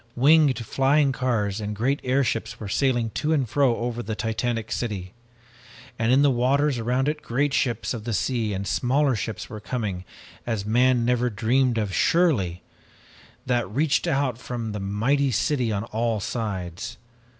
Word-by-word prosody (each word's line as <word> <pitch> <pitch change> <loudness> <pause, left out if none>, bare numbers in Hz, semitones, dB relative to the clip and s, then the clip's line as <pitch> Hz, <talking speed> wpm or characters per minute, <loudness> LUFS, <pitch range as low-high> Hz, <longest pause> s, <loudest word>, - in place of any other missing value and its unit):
"Winged 145 +1 +5
flying 135 +4 +2
cars 115 -6 -1
and 105 0 -4
great 130 +7 0
airships 125 -3 0
were 105 - -6
sailing 120 +1 +1
to 155 +7 0
and 140 -5 +1
fro 135 0 +2
over 120 0 -3
the 110 -1 -4
titanic 115 +1 -2
city, 95 -6 -3 0.9
and 115 +1 +2
in 135 +3 +5
the 145 - +5
waters 130 +2 +2
around 125 +4 0
it 150 0 -1
great 135 +4 0
ships 120 -5 0
of 115 -3 -6
the 120 - -3
sea 115 +1 0
and 100 0 -3
smaller 135 +6 +1
ships 110 -1 -4
were 110 - -8
coming 105 -5 -3 0.4
as 110 -4 -3
man 120 +2 +3
never 125 0 +2
dreamed 120 +3 +1
of 105 -3 -1
surely, 105 - +2 0.8
that 120 -4 0
reached 140 - +1
out 135 -6 0
from 120 -3 -5
the 105 - -4
mighty 115 +9 +1
city 125 0 0
on 100 0 -1
all 115 0 -1
sides. 95 -5 -4
120 Hz, 160 wpm, -24 LUFS, 110-135 Hz, 0.9 s, Winged